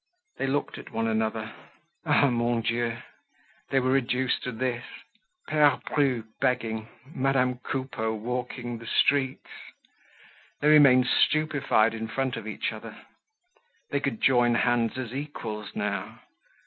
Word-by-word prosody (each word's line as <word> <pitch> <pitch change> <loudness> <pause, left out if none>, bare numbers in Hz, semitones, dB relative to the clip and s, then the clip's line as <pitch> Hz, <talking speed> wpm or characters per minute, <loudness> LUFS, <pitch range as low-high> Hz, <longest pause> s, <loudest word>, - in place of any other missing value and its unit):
They 135 - -1
looked 145 +2 -2
at - - -11
one 115 0 -1
another. 110 0 -1 0.5
Ah! 145 -1 +5
Mon 120 0 +1
Dieu! 115 +1 -1 0.7
They 135 - +3
were 130 0 +1
reduced 130 -1 +1
to 125 - -4
this—Pere 145 - -1 0.2
Bru 135 -6 +2 0.2
begging, 115 -4 0 0.3
Madame 130 -2 +1
Coupeau 130 -4 -3
walking 120 +1 -4
the 115 - -10
streets! 135 +1 +2 1.1
They 150 - +3
remained 140 -4 +7
stupefied 140 -6 +2
in 110 0 -4
front 130 +2 -2
of - - -7
each - - -2
other. - - -9 0.9
They 140 - +1
could 135 -6 -3
join 120 -2 +4
hands 120 -1 +1
as 125 -2 -5
equals 115 -7 -6
now. 100 -1 -3
125 Hz, 125 wpm, -27 LUFS, 115-135 Hz, 1.1 s, remained